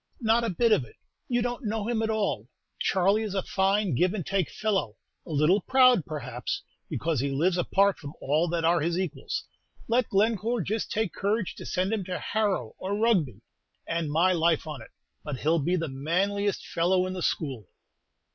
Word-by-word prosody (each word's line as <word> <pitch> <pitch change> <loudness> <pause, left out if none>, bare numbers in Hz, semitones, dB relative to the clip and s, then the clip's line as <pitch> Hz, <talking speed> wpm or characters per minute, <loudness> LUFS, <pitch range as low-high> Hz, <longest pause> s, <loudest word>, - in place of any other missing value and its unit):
"Not 230 +1 +3
a 230 - 0
bit 230 +5 +2
of 140 - +4
it. 115 - -14 0.3
You 240 -1 +1
don't 245 +2 -3
know 215 0 -2
him 235 -2 0
at 220 - 0
all. 220 -2 -1 0.3
Charley 195 +3 +2
is 210 -3 -3
a 190 - 0
fine 195 -2 +1
give 180 - +2
and 185 -7 -4
take 195 -4 0
fellow; 195 - -1 0.3
a - - -10
little 155 +6 +3
proud, 255 - +4
perhaps, 130 -5 -4 0.3
because 160 -4 -1
he 140 +3 0
lives 165 +7 +1
apart 195 +2 +2
from 145 -1 -8
all 155 +5 +1
that 165 -1 -1
are 170 +1 +4
his 170 +3 0
equals. 185 -4 -3 0.4
Let 240 0 +2
Glencore 220 +3 +1
just 215 +6 -2
take 220 -3 -1
courage 205 0 -1
to - - -9
send 185 +3 0
him 215 -3 -1
to 180 -1 -3
Harrow 205 - -1
or 195 +2 -2
Rugby, 175 - +1 0.5
and 165 -3 -1
my 170 +5 +4
life 165 -2 +2
on 150 -5 -6
it, - - -12 0.3
but 150 -4 -4
he 145 - -5
'll 165 +1 +4
be 175 +5 +1
the 165 -2 -1
manliest 190 +9 -1
fellow 180 +2 +1
in 185 - -3
the 185 - -5
school." 130 - -2
185 Hz, 195 wpm, -27 LUFS, 160-215 Hz, 0.5 s, of